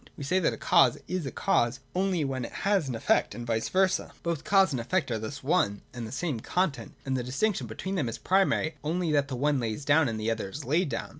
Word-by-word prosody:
We - - -6
say 180 +7 +2
that 180 - +2
a - - -6
cause 175 -2 +4
is 180 -5 -2
a - - -4
cause, 120 +2 +1
only 185 -4 +1
when 130 -2 -2
it - - -6
has 195 -8 +2
an 125 - -2
effect, 115 - +1
and 120 - -6
vice 115 -1 -1
versa. 185 -1 +1
Both 170 -3 -2
cause 195 -4 +4
and 130 - -1
effect 140 +3 -1
are 110 - -1
thus 140 +6 -6
one 130 - +1
and 120 -2 -5
the - - -9
same 140 -2 -2
content: 145 -4 -2
and 135 -1 -1
the 125 - -1
distinc 140 - 0
tion 125 - -5
between 190 - -5
them 150 -11 0
is 115 - -5
primarily 190 -4 +2
only 165 +2 0
that 145 -1 +2
the 135 - -4
one 145 +2 +1
lays 115 +3 -3
down, 145 -2 +4
and 110 -1 -3
the 110 +1 0
other 110 -3 -3
is 145 +8 -7
laid 155 +5 +1
down. - - -4
145 Hz, 255 wpm, -28 LUFS, 120-180 Hz, -, cause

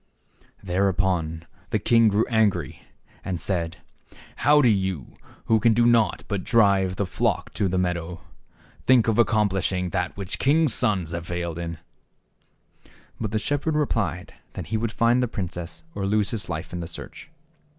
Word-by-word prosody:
Thereupon 90 -3 0 0.2
the 110 - +1
king 115 +2 +4
grew 105 +1 +2
angry, 105 - 0 0.4
and 90 -3 -3
said, 85 -3 -2 0.3
" - - -21
How 150 0 +7
do 135 - +5
you, 95 - -1 0.3
who 110 -1 +3
can 110 +1 +3
do 120 +1 +4
naught 115 -2 +3
but 100 -3 -2
drive 100 -6 +3
the 100 - -1
flock 90 - -1
to 100 - 0
the 95 0 -1
meadow, 90 -1 -2 0.7
think 125 -3 +5
of 110 0 +2
accomplishing 95 -5 +1
that 90 -2 -2
which 100 -1 -4
kings' 150 0 +3
sons 95 -7 0
have 85 0 -5
failed 85 -1 -3
in? 85 -1 -5 0.7
" - - -25
But 110 - -1
the 110 - -1
shepherd 145 +6 -1
replied 115 - -1 0.2
that - - -7
he - - +2
would 110 0 -2
find 120 +2 +3
the 125 - +1
princess 90 -6 -6
or 100 -7 -3
lose 105 +2 +1
his 110 -5 -3
life 85 +1 -5
in 90 - -3
the 85 - -5
search. 85 - -9
100 Hz, 170 wpm, -24 LUFS, 90-115 Hz, 0.7 s, How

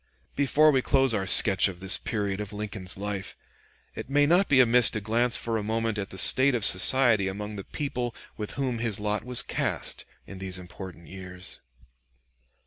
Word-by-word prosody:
Before 150 +2 +2
we 135 -2 +1
close 135 -2 +2
our 95 -3 -3
sketch 95 0 +5
of 90 -3 -9
this 95 0 -1
period 100 -2 -4
of 105 -1 -7
Lincoln's 105 -3 -1
life, 100 -1 -6 0.6
it - - -9
may 145 +1 +2
not 175 +6 +2
be 135 - +3
amiss 125 -1 +4
to 110 - -4
glance 115 +3 0
for 115 -1 -3
a 105 - -5
moment 110 0 -3
at 100 - -5
the 95 - -10
state 130 +7 +5
of 110 -4 +2
society 110 +1 +5
among 105 +2 -7
the 100 - -8
people 125 -5 -5 0.2
with 105 -1 -7
whom 130 -4 -4
his 115 -4 -3
lot 105 0 -3
was 125 -1 -3
cast - - -4 0.2
in 100 - -11
these 95 -1 -5
important 90 -2 -12
years. 90 +1 -10
105 Hz, 185 wpm, -25 LUFS, 95-125 Hz, 0.6 s, sketch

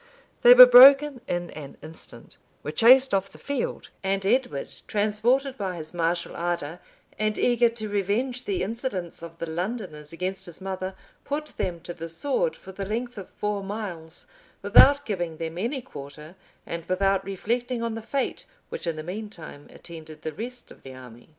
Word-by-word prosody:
They - - +9
were - - +13
broken 275 - +8
in 175 0 -3
an 145 -3 -10
instant; 160 +1 -13 0.3
were 150 - -4
chased 255 - +6
off 195 0 +1
the - - -15
field; 280 -3 -4
and 195 0 -1
Edward, 220 - 0 0.2
transported 235 +6 +1
by 190 -3 -3
his 155 -1 -6
martial 170 0 -1
ardor, 170 -1 -3 0.4
and 215 0 0
eager 240 -1 +3
to 225 -2 -2
revenge 210 +6 -1
the 195 -2 -1
insolence 200 -6 -4
of 165 0 -10
the 170 - -4
Londoners 165 -3 -5
against 185 +2 -3
his 175 - -7
mother,[*] 190 0 -5 0.3
put 300 +2 -4
them 170 -2 -3
to 175 - -7
the 165 -1 -7
sword 285 - -1
for 190 - -12
the 195 +1 -6
length 235 +2 -4
of 190 - -10
four 210 -1 -3
miles, 185 -5 -5 0.4
without 285 0 +6
giving 175 -6 -3
them 165 +1 -5
any 245 +5 -2
quarter, 150 - -11 0.3
and 170 0 -5
without 195 +1 +1
reflecting 235 +5 -2
on 230 -1 -2
the 225 - -5
fate 270 +4 -3 0.2
which - - -5
in 165 - -1
the 155 - -6
mean 205 +6 -6
time 160 -7 -11
attended 160 -2 -11
the 155 - -4
rest 245 +7 -7
of - - -15
the 130 -1 -11
army. 125 -1 -13
195 Hz, 175 wpm, -25 LUFS, 170-240 Hz, 0.4 s, were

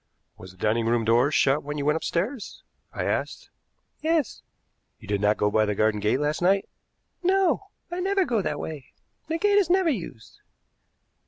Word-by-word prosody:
"Was 95 - -12
the - - -22
dining 110 +4 0
room 115 -1 +1
door 120 +5 +4
shut 145 -1 +2
when 150 +1 -5
you 140 - -2
went 150 +1 +3
upstairs?" 195 - -3 0.3
I - - -4
asked. - - -3 0.5
"Yes." 320 -2 0 0.6
"You - - -15
did 100 -1 -1
not 105 +1 +3
go 105 0 +1
by 110 +1 +3
the 105 -1 -1
garden 110 0 +1
gate 105 +5 +1
last 150 +2 -1
night?" 195 +2 +2 0.5
"No. 375 0 +2 0.2
I 350 - -3
never 385 +1 +1
go 230 -8 0
that 150 -5 -3
way. 150 -5 -7 0.3
The 325 +1 -1
gate 410 +3 +3
is 375 -4 +1
never 365 -2 +3
used." 165 - -7
150 Hz, 180 wpm, -25 LUFS, -, 0.6 s, door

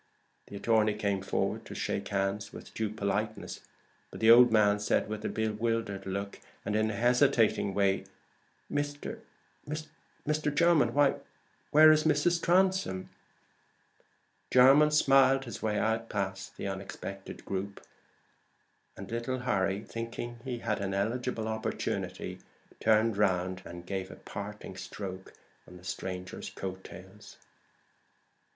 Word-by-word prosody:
The - - -9
attorney 110 0 +2
came 100 -2 -1
forward 95 - -1
to - - -8
shake 100 - -2
hands 100 +1 -1
with - - -11
due 110 -1 -1
politeness, 100 -1 -3 0.5
but - - -10
the 110 0 +6
old 120 0 +8
man 105 -2 +4
said, 105 - +1
with 105 0 -5
a - - -1
bewildered 110 -2 -2
look, 100 +1 -4 0.3
and 105 - -1
in 110 0 +2
a 110 - -3
hesitating 120 -3 +3
way 100 -1 +2 0.7
"Mr. 145 0 -3 1.1
Jermyn? 155 +1 +3
why 145 -1 +6
why - - -6 0.5
where 155 +1 +8
is 155 0 +3
Mrs. 165 +3 +2
Transome?" 185 - +2 1.4
Jermyn 135 +4 +7
smiled 135 -2 +4
his 115 -5 -7
way 105 -1 0
out 115 +1 0
past 95 -1 -4
the - - -4
unexpected 95 0 -7
group; 100 +1 -4 1.2
and 95 +1 -8
little 120 +2 -2
Harry, 95 -4 0
thinking 115 +1 -6
he 125 -2 -3
had 115 - -2
an 95 0 -2
eligible 115 +2 -1
opportunity, 110 0 -3 0.4
turned 110 -1 +3
round 95 -2 +1
to - - -11
give 95 0 -4
a - - -9
parting 100 -1 -8
stroke 95 0 -7 0.3
on 90 - -12
the 90 - -16
stranger's 90 0 -5
coat 95 0 -6
tails. 95 +4 -12
110 Hz, 130 wpm, -30 LUFS, 100-125 Hz, 1.4 s, old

